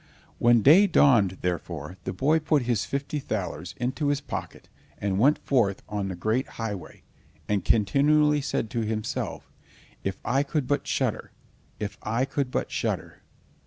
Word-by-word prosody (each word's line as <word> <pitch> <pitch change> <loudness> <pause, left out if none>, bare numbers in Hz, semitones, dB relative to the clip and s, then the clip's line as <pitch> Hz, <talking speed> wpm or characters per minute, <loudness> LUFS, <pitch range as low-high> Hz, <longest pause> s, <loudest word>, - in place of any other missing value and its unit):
When 120 -2 +5
day 180 +9 +7
dawned, 115 - +4
therefore, 85 -2 -3
the - - -2
boy 150 +11 +2
put 150 -3 +1
his 120 -4 0
fifty 140 +2 -3
thalers 110 -8 -4
into 130 +5 -1
his 145 -1 +1
pocket, 140 - -7 0.3
and 100 -1 -1
went 140 +7 +5
forth 110 -8 +1
on 100 -2 -3
the 95 - -4
great 110 +8 0
highway, 105 -6 -6 0.4
and 100 -3 0
continually 150 +7 +3
said 115 -5 -2
to 115 - -1
himself, 110 0 -3 0.6
"If 95 - -2
I 135 +4 +2
could 145 -1 -1
but 145 - 0
shudder! - - -1 0.5
If 105 -1 -5
I 115 +4 0
could 135 -1 -2
but - - -2
shudder!" - - -3
120 Hz, 155 wpm, -26 LUFS, 100-145 Hz, 0.6 s, day